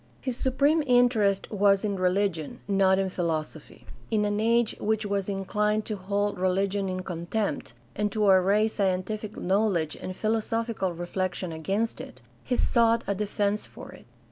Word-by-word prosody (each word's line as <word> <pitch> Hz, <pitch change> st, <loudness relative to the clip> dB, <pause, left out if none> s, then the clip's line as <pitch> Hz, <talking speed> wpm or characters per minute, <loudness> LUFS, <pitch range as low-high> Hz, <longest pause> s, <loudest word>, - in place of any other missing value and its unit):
His 255 Hz, -, -3 dB
supreme 280 Hz, +5 st, +2 dB
interest 240 Hz, -6 st, +3 dB
was 200 Hz, 0 st, +3 dB
in 200 Hz, -1 st, -1 dB
religion, 185 Hz, -4 st, -1 dB
not 195 Hz, -1 st, +3 dB
in 195 Hz, 0 st, +1 dB
philosophy. 160 Hz, -3 st, -4 dB, 0.2 s
In 215 Hz, -2 st, +1 dB
an 205 Hz, 0 st, 0 dB
age 230 Hz, +1 st, +2 dB
which 220 Hz, 0 st, 0 dB
was 200 Hz, -1 st, -1 dB
inclined 210 Hz, +2 st, 0 dB
to 215 Hz, -, -3 dB
hold 200 Hz, +1 st, -2 dB
religion 195 Hz, +1 st, 0 dB
in 185 Hz, 0 st, -3 dB
contempt, 175 Hz, -, -3 dB, 0.2 s
and 210 Hz, 0 st, -1 dB
to 215 Hz, 0 st, 0 dB
array 195 Hz, +2 st, +4 dB
scientific 205 Hz, +1 st, -2 dB
knowledge 185 Hz, -5 st, 0 dB
and 185 Hz, -, -7 dB
philosophical 225 Hz, -2 st, -1 dB
reflection 175 Hz, +1 st, -3 dB
against 195 Hz, +8 st, -2 dB
it, -, -, -11 dB, 0.2 s
he 250 Hz, -, -1 dB
sought 230 Hz, -1 st, +3 dB
a 200 Hz, -, 0 dB
defense 205 Hz, +1 st, -1 dB
for -, -, -11 dB
it. -, -, -15 dB
200 Hz, 150 wpm, -27 LUFS, 185-215 Hz, 0.2 s, array